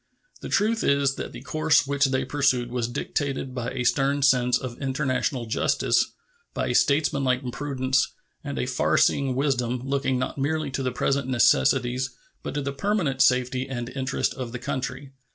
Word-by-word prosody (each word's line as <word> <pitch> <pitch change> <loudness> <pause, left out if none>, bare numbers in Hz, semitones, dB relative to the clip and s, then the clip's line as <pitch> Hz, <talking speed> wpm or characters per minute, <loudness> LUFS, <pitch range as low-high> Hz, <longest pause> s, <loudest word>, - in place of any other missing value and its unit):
The - - -6
truth 225 +2 +1
is 140 -1 +2
that - - -5
the 120 +1 -10
course 155 +2 +2
which 140 0 +2
they 130 0 0
pursued 130 -3 +1
was 120 -2 -1
dictated 135 +2 -3
by 125 -1 -3
a 125 -1 -3
stern 140 +3 +1
sense 125 -2 +4
of 125 0 -7
international 135 -2 -1
justice, 110 - +1 0.4
by - - -1
a - - 0
statesmanlike 135 -3 +2
prudence 130 -1 0 0.3
and 140 -1 -5
a - - 0
far 125 0 +1
seeing 135 -2 +2
wisdom, 125 -3 0
looking 135 -1 0
not 130 +2 -3
merely 150 +1 -1
to 135 - -2
the 130 -1 -1
present 135 +2 0
necessities 125 - +2 0.3
but - - -6
to 145 - -1
the 140 0 -3
permanent 150 -4 0
safety 125 +1 +2
and 120 -2 -4
interest 130 0 -1
of 125 -3 -6
the - - -3
country. 130 +2 -4
130 Hz, 170 wpm, -25 LUFS, 125-140 Hz, 0.4 s, sense